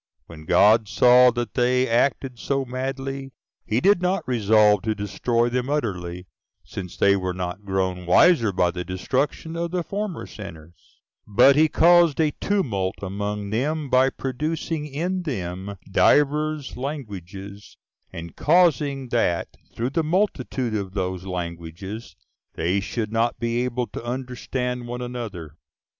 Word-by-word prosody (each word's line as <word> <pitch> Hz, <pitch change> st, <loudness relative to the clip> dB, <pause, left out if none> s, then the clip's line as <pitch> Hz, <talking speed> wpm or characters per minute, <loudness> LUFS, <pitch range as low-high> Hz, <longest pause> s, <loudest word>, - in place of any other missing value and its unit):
When 80 Hz, -2 st, -12 dB
God 110 Hz, +5 st, +5 dB
saw 125 Hz, +3 st, +6 dB
that 120 Hz, -4 st, -3 dB
they 125 Hz, +1 st, +2 dB
acted 125 Hz, +1 st, 0 dB
so 135 Hz, +1 st, -1 dB
madly, 135 Hz, +1 st, -4 dB, 0.3 s
he 110 Hz, -, +1 dB
did 195 Hz, +4 st, +4 dB
not 185 Hz, +2 st, 0 dB
resolve 105 Hz, -4 st, +4 dB
to 110 Hz, -1 st, -1 dB
destroy 115 Hz, +4 st, 0 dB
them 125 Hz, +2 st, -2 dB
utterly, 90 Hz, -11 st, -3 dB, 0.4 s
since 90 Hz, -3 st, -8 dB
they 100 Hz, 0 st, +4 dB
were 95 Hz, -2 st, -2 dB
not 90 Hz, +2 st, -5 dB
grown 95 Hz, -2 st, -2 dB
wiser 115 Hz, -, +5 dB
by 90 Hz, -2 st, +1 dB
the 90 Hz, 0 st, -5 dB
destruction 130 Hz, -, -2 dB
of 170 Hz, 0 st, -2 dB
the 175 Hz, 0 st, -2 dB
former 200 Hz, -1 st, -4 dB
sinners; 85 Hz, -5 st, -12 dB, 0.3 s
but 125 Hz, +7 st, +6 dB
he 155 Hz, +2 st, +5 dB
caused 170 Hz, -1 st, +4 dB
a 155 Hz, -2 st, +3 dB
tumult 110 Hz, -, 0 dB
among 100 Hz, +1 st, -4 dB
them, 145 Hz, +5 st, -1 dB
by 130 Hz, +1 st, +5 dB
producing 150 Hz, +4 st, -3 dB
in 175 Hz, +6 st, -2 dB
them 95 Hz, -, -5 dB
divers 150 Hz, +4 st, +2 dB
languages, 100 Hz, -, -7 dB, 0.3 s
and 85 Hz, 0 st, -8 dB
causing 145 Hz, -5 st, +2 dB
that, 115 Hz, -8 st, 0 dB, 0.3 s
through 120 Hz, +3 st, -2 dB
the 165 Hz, -, +1 dB
multitude 150 Hz, -, -1 dB
of 100 Hz, -2 st, -4 dB
those 95 Hz, -1 st, -3 dB
languages, 90 Hz, +4 st, -6 dB, 0.4 s
they 90 Hz, +4 st, 0 dB
should 105 Hz, +2 st, -3 dB
not 115 Hz, +1 st, 0 dB
be 120 Hz, +1 st, 0 dB
able 125 Hz, 0 st, -2 dB
to -, -, -8 dB
understand 125 Hz, 0 st, -4 dB
one 125 Hz, +1 st, -5 dB
another. 105 Hz, -11 st, -7 dB
120 Hz, 140 wpm, -23 LUFS, 100-140 Hz, 0.4 s, saw